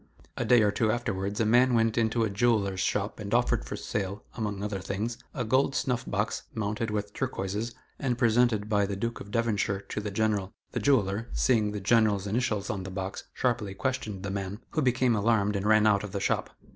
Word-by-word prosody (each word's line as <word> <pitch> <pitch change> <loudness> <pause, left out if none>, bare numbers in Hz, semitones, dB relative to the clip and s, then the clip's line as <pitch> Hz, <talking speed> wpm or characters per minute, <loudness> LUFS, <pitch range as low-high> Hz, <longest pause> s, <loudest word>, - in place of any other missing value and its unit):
A - - -2
day 120 -3 +6
or 105 - +3
two 110 +1 +1
afterwards 100 -4 -2
a 115 - +3
man 120 +3 +4
went 115 -1 +2
into 115 0 +2
a 110 - +1
jeweller's 100 -3 +1
shop 100 +2 -1
and 100 -1 -6
offered 120 0 +2
for - - -5
sale, 100 0 -3
among 105 -4 -3
other 105 -2 -2
things, 105 +6 -3
a 125 - -3
gold 130 +4 +2
snuff 125 -2 -1
box, 105 +2 -1
mounted 110 +1 -2
with 105 -1 -3
turquoises, 105 +5 -3 0.2
and 125 -4 0
presented 120 -3 +3
by 100 -2 +2
the 100 - -3
Duke 115 +4 -3
of 100 - -9
Devonshire 105 -3 0
to 105 - -3
the 105 - -3
General. 105 -1 0 0.2
The - - -2
jeweller, 115 -4 +1
seeing 110 -5 +2
the 105 - -4
General's 105 -1 +3
initials 105 -2 -1
on 100 -2 -3
the 95 - -6
box, 95 0 -5
sharply 115 -6 -1
questioned 110 -6 -3
the 100 - -3
man, 100 +2 -4
who 155 - 0
became 125 -2 +2
alarmed 105 -1 +2
and 100 +1 -1
ran 110 0 +5
out 105 -2 +4
of 105 - -7
the 100 - -1
shop. - - 0
105 Hz, 210 wpm, -28 LUFS, 100-115 Hz, 0.2 s, day